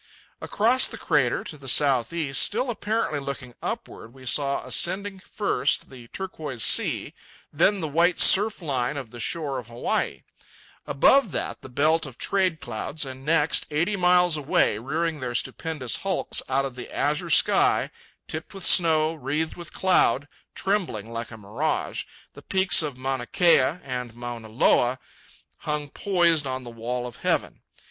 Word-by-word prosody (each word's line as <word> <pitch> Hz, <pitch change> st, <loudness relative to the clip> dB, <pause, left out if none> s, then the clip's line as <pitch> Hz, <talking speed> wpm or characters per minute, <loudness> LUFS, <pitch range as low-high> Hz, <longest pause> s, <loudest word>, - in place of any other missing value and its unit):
Across 240 Hz, +5 st, +3 dB
the -, -, -8 dB
crater, 140 Hz, -7 st, +1 dB
to 150 Hz, -, -8 dB
the 135 Hz, -, -11 dB
south 130 Hz, -2 st, +2 dB
east, 150 Hz, -6 st, 0 dB
still 245 Hz, +4 st, +2 dB
apparently 215 Hz, -8 st, -1 dB
looking 135 Hz, -3 st, -6 dB
upward, 115 Hz, +3 st, -6 dB
we 130 Hz, -1 st, -14 dB
saw 140 Hz, +2 st, 0 dB
ascending, 195 Hz, +2 st, -1 dB
first, 145 Hz, -, -1 dB
the 125 Hz, -3 st, -12 dB
turquoise 155 Hz, -, -5 dB
sea, -, -, +2 dB, 0.4 s
then 190 Hz, +6 st, +3 dB
the 160 Hz, -, -2 dB
white 170 Hz, +4 st, +2 dB
surf 210 Hz, -1 st, +5 dB
line 135 Hz, -2 st, -1 dB
of 130 Hz, -5 st, -7 dB
the 120 Hz, -, -10 dB
shore 140 Hz, +1 st, -2 dB
of 120 Hz, -, -10 dB
Hawaii; 120 Hz, +1 st, -2 dB, 0.6 s
above 235 Hz, -, +4 dB
that -, -, -4 dB
the 130 Hz, -, -11 dB
belt 155 Hz, +4 st, +1 dB
of 130 Hz, -2 st, -12 dB
trade 185 Hz, -5 st, 0 dB
clouds, 145 Hz, +7 st, -4 dB
and 130 Hz, 0 st, -9 dB
next, 155 Hz, +1 st, +2 dB
eighty 165 Hz, +7 st, 0 dB
miles 180 Hz, -2 st, +4 dB
away, 135 Hz, -7 st, +1 dB
rearing 160 Hz, +5 st, -2 dB
their 125 Hz, -2 st, -4 dB
stupendous 150 Hz, -3 st, -3 dB
hulks 195 Hz, -2 st, -1 dB
out 135 Hz, +1 st, +1 dB
of 135 Hz, -, -5 dB
the 125 Hz, -, -8 dB
azure 145 Hz, +1 st, -1 dB
sky, -, -, +3 dB, 0.4 s
tipped 160 Hz, +5 st, -5 dB
with 195 Hz, -, -4 dB
snow, 160 Hz, -2 st, +4 dB
wreathed 155 Hz, +2 st, -3 dB
with 175 Hz, -1 st, -9 dB
cloud, 145 Hz, -7 st, +2 dB, 0.3 s
trembling 165 Hz, -, -2 dB
like 115 Hz, 0 st, -5 dB
a 110 Hz, -, -10 dB
mirage, 115 Hz, +10 st, -2 dB, 0.3 s
the -, -, -12 dB
peaks 190 Hz, -2 st, +2 dB
of 145 Hz, -5 st, -4 dB
Mauna 130 Hz, -1 st, -3 dB
Kea 170 Hz, -3 st, +3 dB
and 125 Hz, -3 st, -5 dB
Mauna 120 Hz, -2 st, -7 dB
Loa 120 Hz, +2 st, +3 dB, 0.6 s
hung 150 Hz, -1 st, -3 dB
poised 170 Hz, -5 st, +2 dB
on 130 Hz, 0 st, -4 dB
the 120 Hz, -, -9 dB
wall 120 Hz, +2 st, -4 dB
of 120 Hz, -, -8 dB
heaven. -, -, -1 dB
145 Hz, 160 wpm, -25 LUFS, 125-175 Hz, 0.6 s, surf